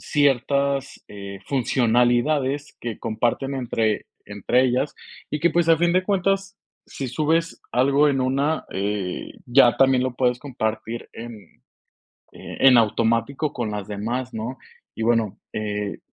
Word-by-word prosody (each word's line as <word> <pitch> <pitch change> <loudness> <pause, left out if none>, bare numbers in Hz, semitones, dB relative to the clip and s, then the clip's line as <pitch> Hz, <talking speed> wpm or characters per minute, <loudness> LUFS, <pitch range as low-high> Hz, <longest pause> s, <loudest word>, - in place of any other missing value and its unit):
Ciertas, 140 0 +1
eh, 100 -1 -8
funcionalidades 130 +4 +1
que 120 -2 -5
comparten 120 +5 -1
entre 115 -4 -1 0.2
entre 105 +5 +1
ellas, 130 +3 0 0.4
y 150 - -2
que, 170 - +3
pues, 170 -1 +1
a 165 - +6
fin 170 +1 +2
de 185 +1 +3
cuentas, 195 0 0 0.3
si 135 -2 -5
subes 160 +5 0
algo 140 +4 +4
en 135 -2 +1
una, 140 +5 0
eh, 100 -1 -3
ya 120 -1 +5
también 130 -1 +4
lo 130 -1 -2
puedes 125 -1 +1
compartir 115 -3 -4
en, 120 +1 -7 1.0
eh, - - -10
en 130 -2 +7
automático 115 +6 +1
con 120 -3 -3
las 105 -1 -5
demás, 120 +5 -3
¿no? 115 +4 -5 0.4
Y, 110 - -3
bueno, 115 -3 +1 0.2
eh, 105 -1 -3
125 Hz, 140 wpm, -23 LUFS, 110-140 Hz, 1.0 s, en